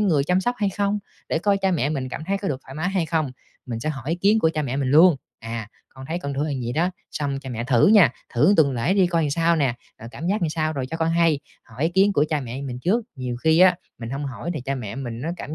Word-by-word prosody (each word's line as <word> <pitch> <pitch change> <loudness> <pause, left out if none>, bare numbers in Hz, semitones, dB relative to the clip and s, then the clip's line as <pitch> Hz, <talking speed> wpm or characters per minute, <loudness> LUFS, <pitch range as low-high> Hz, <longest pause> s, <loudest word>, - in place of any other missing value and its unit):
người 160 -9 +2
chăm 180 +3 +2
sóc 245 +6 0
hay 200 -2 +1
không, 205 +1 0 0.3
để - - +1
coi 200 +3 +2
cha 190 -1 +1
mẹ 145 -6 +1
mình 135 -4 -2
cảm 140 - -6
thấy 200 +1 0
có 195 - -3
được 135 -2 -3
thoải 135 - -11
mái 160 +4 -1
hay 185 -4 0
không. 155 -4 -1 0.3
Mình 115 -2 -4
sẽ 155 - -2
hỏi 135 -1 -4
ý - - +2
kiến 200 +5 +3
của 160 -7 +3
cha 155 - 0
mẹ 135 -1 -2
mình 135 -2 0
luôn: 160 +2 +7 0.2
"À, 115 -1 -6 0.2
con 130 0 -11
thấy 170 +2 -2
con 140 -4 -4
thử 140 - -1
là 155 - -2
vậy 120 +1 -3
đó, 175 +4 +1 0.2
xong 140 -2 -2
cha 135 - -8
mẹ 115 -1 -3
thử 120 -2 +4
nha, 195 - +6 0.2
thử 150 +12 +5
tuần 140 -4 +4
lễ 125 +11 0
đi 190 -3 +4
coi 170 -2 +1
làm 145 - 0
sao 165 +2 +2
nè, 135 -6 +1 0.3
rồi 115 - -8
cảm 150 +6 -6
giác 195 +1 0
làm 165 - +2
sao 155 0 -1
rồi 135 -3 -3
cho 165 - -3
con 165 0 0
hay." 165 -3 +3 0.2
Hỏi 115 +6 -8
ý 160 - +3
kiến 195 +3 +3
của 150 -4 +3
cha 155 -2 0
mẹ 130 +1 -6
mình 125 -3 -5
trước, 210 - +1
nhiều 125 -2 -4
khi 160 +5 +3
á 185 -1 +6 0.2
mình 115 0 -6
hông 140 +2 -3
hỏi 140 +5 -5
thì 150 - -3
cha 135 +2 -3
mẹ 120 -6 -5
á - - -7
mình 120 -2 -5
cảm 155 -1 -6
155 Hz, 300 wpm, -23 LUFS, 130-175 Hz, 0.3 s, luôn